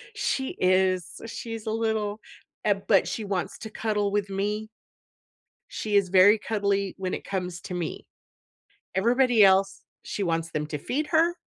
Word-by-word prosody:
she 265 -1 -1
is 185 -1 +1
she's 225 -1 -6
a - - 0
little 220 -2 -1 0.4
Eh, 210 - +4
but 195 -4 +4
she 200 +5 -3
wants 195 -3 -3
to 220 - -7
cuddle 210 -2 -1
with 205 -1 0
me. 205 +2 -2 1.0
She 210 -1 -3
is 200 -3 +3
very 195 +3 +7
cuddly 200 -2 -1
when 185 -1 -3
it - - -4
comes 180 -2 -4
to - - -7
me, 175 -3 -4 0.9
everybody 235 +2 +4
else, 195 0 +3 0.2
she 205 - -4
wants 165 -2 -1
them 150 -1 -2
to 150 -1 -3
feed 290 - -2
her, 335 +1 +3
200 Hz, 155 wpm, -26 LUFS, 185-220 Hz, 1.0 s, very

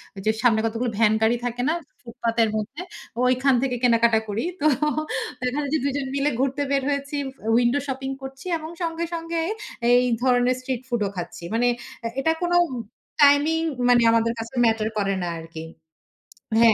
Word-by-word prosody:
ওইযে, 195 +2 0
সামনে 225 -3 +4
কতগুলো 230 +2 -1
ভ্যান 215 -1 +4
গাড়ি 225 +2 +3
থাকে 245 0 -2
না - - +2 0.3
ফুটপাতের 230 -1 0
মধ্যে। 225 +9 -4 0.4
ওইখান 255 +2 +3
থেকে 260 -2 0
কেনাকাটা 235 -2 +4
করি। 205 +2 -2 0.2
তো - - 0 0.8
এখানে 285 +3 -1
যে, - - +4
দুজন 280 -1 -1
মিলে 280 +1 +2
ঘুরতে 270 +2 0
বের 275 -1 +2
হয়েছি, 280 +1 -2 0.4
উইন্ডো 240 +3 +3
শপিং 265 0 -3
করছি, 270 +2 -9
এবং 315 0 -8
সঙ্গে, 335 0 -2
সঙ্গে 330 0 -3 0.5
এই 245 +1 +6 0.2
ধরনের 250 0 +3
স্ট্রিট 255 -1 -3
ফুড 240 -3 -1
ও - - -4
খাচ্ছি। 175 -1 -6
মানে, 240 +2 +2 0.3
অ্যা 230 - -3
এটা 320 +4 +2
কোনো 350 0 +2 0.6
টাইমিং, 290 +3 +5 0.3
মানে 245 -1 +6
আমাদের 230 0 +2
কাছে 230 +3 -7
ম্যাটার 220 -1 +1
করে 195 -1 +1
না - - -2
আরকি। 165 0 -8 1.0
হ্যাঁ, 230 -1 +7
245 Hz, 165 wpm, -24 LUFS, 230-280 Hz, 1.0 s, হ্যাঁ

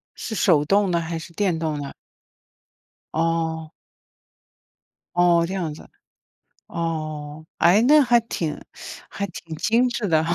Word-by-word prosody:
是 220 - -5
手 160 -6 +4
动 200 +3 +3
的 170 - +2
还 165 0 -4
是 165 +1 -11
电 185 -3 0
动 155 -2 -2
的？ 140 - -6 1.2
哦。 160 -1 -1 1.5
哦， 175 -1 +4
这 190 - -5
样 170 -6 -2
子。 - - -13 0.8
哦。 155 -2 -4
诶， 175 +5 +5
那 300 +5 +6
还 240 -2 +4
挺 170 -9 -4 0.5
还 200 - -3
挺 165 -3 -9
精 235 +9 +2
致 240 -3 -2
的 160 -1 +3
哈。 170 +1 0
170 Hz, 145 characters per minute, -23 LUFS, 160-200 Hz, 1.5 s, 那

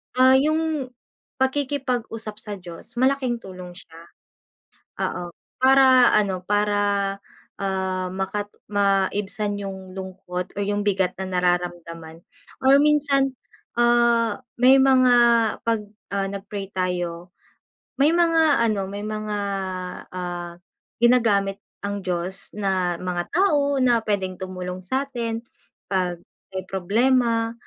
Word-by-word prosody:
Ah, 260 +1 +6
yung 305 -1 +1 0.5
pakikipag-usap 260 -5 -2
sa 210 -2 -8
Diyos 175 +6 -10
malaking 260 -2 +1
tulong 185 -4 -9
siya. 170 -2 -15 1.0
Oo, 175 -1 -3 0.3
para 260 -1 +6
ano, 190 -4 +1
para, 205 -1 +1 0.4
ah, 190 -1 -2
makat 200 +2 -3 0.2
maibsan 205 +1 0
yung 190 -2 -7
lungkot 185 -1 -6
or - - 0
yung 205 0 0
bigat 190 -3 +1
na 190 - -5 0.2
nararamdaman, 175 -2 -2 0.4
or 275 +2 +5
minsan, 285 -2 +3 0.5
ah, 235 -1 +3 0.2
may 255 +2 +7
mga 260 -2 +5 0.5
‘pag, 225 -2 -1 0.2
ah, 200 -1 -1
nag-pray 200 0 -6
tayo, 175 -1 -2 0.7
may 290 - +6
mga 325 -6 +3
ano, 200 -4 -1
may 205 +1 -5
mga, 215 -1 -3 0.7
ah, 175 -1 -5 0.4
ginagamit 210 -5 +3 0.2
ang 200 0 -3
Diyos 180 +1 -4
na 185 -4 0
mga 175 -1 -3
tao 290 -7 +2
na 245 -3 +3
pwedeng 190 -4 -2
tumulong 185 -1 -5
sa’tin, 235 +1 -3 0.4
‘pag 180 -2 -1 0.3
may 190 -1 -5
problema, 230 +4 +1
205 Hz, 110 wpm, -23 LUFS, 185-250 Hz, 1.0 s, may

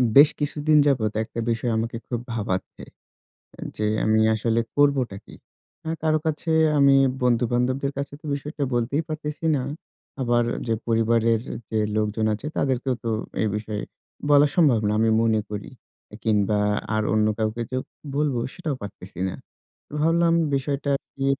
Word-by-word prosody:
বেশ 145 +2 +9
কিছুদিন 150 +1 +2
যাবৎ 115 -7 +2
একটা 115 - -7
বিষয় 115 +1 0
আমাকে 115 +1 -2
খুব 120 - -2
ভাবাচ্ছে। 100 -4 -3 0.8
এ - - -9 0.2
যে 105 - -2 0.2
আমি 110 0 +3 0.2
আসলে 115 +1 +1 0.2
করবোটা 140 -7 +2
কি? - - -14 0.5
আ - - -1
কারো 155 0 +2
কাছে 160 +1 -2 0.3
আমি 140 -1 +6 0.3
বন্ধু-বান্ধবদের 125 +3 +1
কাছে 140 0 -4
তো - - -13
বিষয়টা 145 +1 -4
বলতেই 120 +5 +1
পারতেছি 155 0 -5
না। 135 - 0 0.6
আবার 120 -1 +2 0.2
যে 115 - +2
পরিবারের 115 0 +2 0.3
যে 110 - -1 0.2
লোকজন 110 +1 0
আছে 110 +8 -5
তাদেরকেও 130 -1 0
তো 115 - -1 0.3
এই 110 - +2
বিষয়ে 105 0 -4 0.5
বলা 145 0 +6
সম্ভব 145 -10 +5
না, - - +1
আমি 115 0 +3
মনে 110 -1 +2
করি। 105 -1 -5 0.5
এ - - -6
কিংবা, 105 -2 +2 0.4
আর 110 - +1
অন্য 110 0 +3
কাউকে 110 +1 -1
যে 130 - -1 0.4
বলবো 145 -4 +1
সেটাও 160 -6 -3
পারতেছি 95 -3 -9
না। - - -5 0.7
ভাবলাম 165 +2 +3 0.2
বিষয়টা 140 +1 -2 0.3
কি 135 - -2
120 Hz, 150 wpm, -24 LUFS, 110-145 Hz, 0.8 s, বেশ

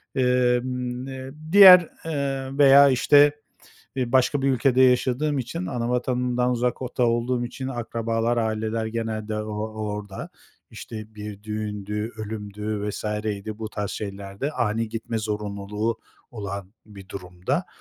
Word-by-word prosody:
Emm, 125 0 +1
eee, 130 0 -7 0.2
diğer, 185 -3 +10 0.2
eee, 135 -3 -3
veya, 140 0 +8
işte, 145 +3 +5 0.7
eee, 125 -2 -2
başka 130 +2 +3
bir 135 - +2
ülkede 130 0 +3
yaşadığım 130 +3 +2
için, 165 +9 -4
ana 120 -1 -2
vatanımdan 125 0 0
uzakta 125 +1 -1
olduğum 120 +1 +1
için 130 +2 -6
akrabalar, 115 -1 -1
aileler 110 0 -1
genelde 110 -1 -3
o 105 0 -4
o 110 0 -4
orada. 100 -2 -7 0.4
İşte, 110 -1 -9
bir 105 -1 -8
düğündü, 105 0 -4
ölümdü, 105 -1 -5
vs.ydi, 105 0 -4
bu 110 -1 -4
tarz 105 -1 -4
şeylerde 100 +6 -5
ani 115 -3 -1
gitme 115 0 -4
zorunluluğu 105 +1 -3 0.3
olan 100 -3 -6
bir 100 -3 -13
durumda, 90 -2 -3
115 Hz, 125 wpm, -24 LUFS, 105-125 Hz, 0.7 s, diğer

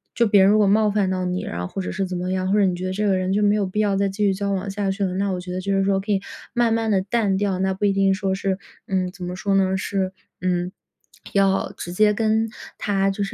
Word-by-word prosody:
就 235 - +3
别 205 -1 +5
人 195 - +6
如 210 - +5
果 210 - +4
冒 210 +2 +4
犯 200 -2 +1
到 185 -1 -1
你， 180 +1 -2
然 85 - -5
后 90 - -3
或 195 - -5
者 185 - -4
是 195 0 -1
怎 185 -1 -4
么 180 +1 -2
样， 185 0 -1
或 200 - +3
者 205 - +4
你 185 - +1
觉 180 +1 -4
得 185 - -2
这 210 +2 -1
个 195 -2 +3
人 185 +1 -1
就 210 +1 +2
没 205 0 +4
有 205 -2 +1
必 190 +3 -1
要 200 -2 +1
再 200 0 +2
继 195 +2 -2
续 195 - +3
交 200 +1 -2
往 195 +1 -3
下 200 0 -2
去 195 +1 -1
了， 185 -2 -1
那 200 +1 0
我 180 -1 -3
觉 180 0 -7
得 180 - -2
就 195 +1 -1
是 195 - +2
说 195 0 +2
可 195 +3 -9
以 195 - +1 0.3
慢 240 -2 +2
慢 225 -1 0
地 195 -3 +3
淡 200 0 0
掉。 195 -1 0
那 190 0 +1
不 190 - -7
一 205 - +4
定 195 0 +3
说 190 0 -1
是 190 0 -1 0.3
嗯， 185 -2 -1
怎 180 -1 -8
么 180 +1 -4
说 195 +1 -1
呢？ 190 -1 +2
是， 190 -1 -2 0.3
嗯， 180 0 -1 0.6
要 195 -1 +2
直 175 - -6
接 210 +3 +3
跟 220 +1 +1 0.3
他 195 -1 +1
就 195 +1 -2
是 - - -7
195 Hz, 325 characters per minute, -22 LUFS, 185-205 Hz, 0.6 s, 人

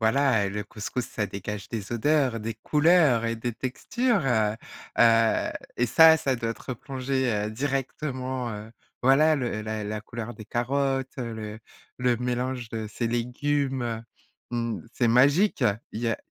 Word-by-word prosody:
voilà, 110 -3 +3
le 105 +1 -4
couscous, 115 +3 -4
ça 105 -1 -3
dégage 100 +1 -6
des 110 -1 -5
odeurs, 130 -1 +2
des 115 +1 -4
couleurs 150 -1 +3
et 115 - -1
des 120 +2 -3
textures, 205 - -1
heu 110 -4 +2 0.4
heu, 115 -1 +4 0.3
et 120 - +2
ça, 160 +6 +8
ça 135 -4 0
doit 115 -1 -2
te - - -16
replonger, 130 0 -2 0.2
heu, 110 - -4
directement, 130 0 -3
heu 105 +1 -7 0.3
voilà, 150 +5 +5
le 120 -5 -2
la 110 0 -4
la 105 +1 -3
couleur 115 +2 -6
des 110 -3 -11
carottes, 135 +3 0
le 110 -3 -5 0.4
le 125 -1 +2
mélange 125 0 -2
de 110 -1 -4
ces 115 - -2
légumes. 125 0 -1 0.5
Mmh, 115 -2 -2
c'est 120 -2 +2
magique! 145 - +4 0.3
Il 110 - -5
y 120 - 0
a 115 - 0
120 Hz, 155 wpm, -26 LUFS, 110-135 Hz, 0.5 s, ça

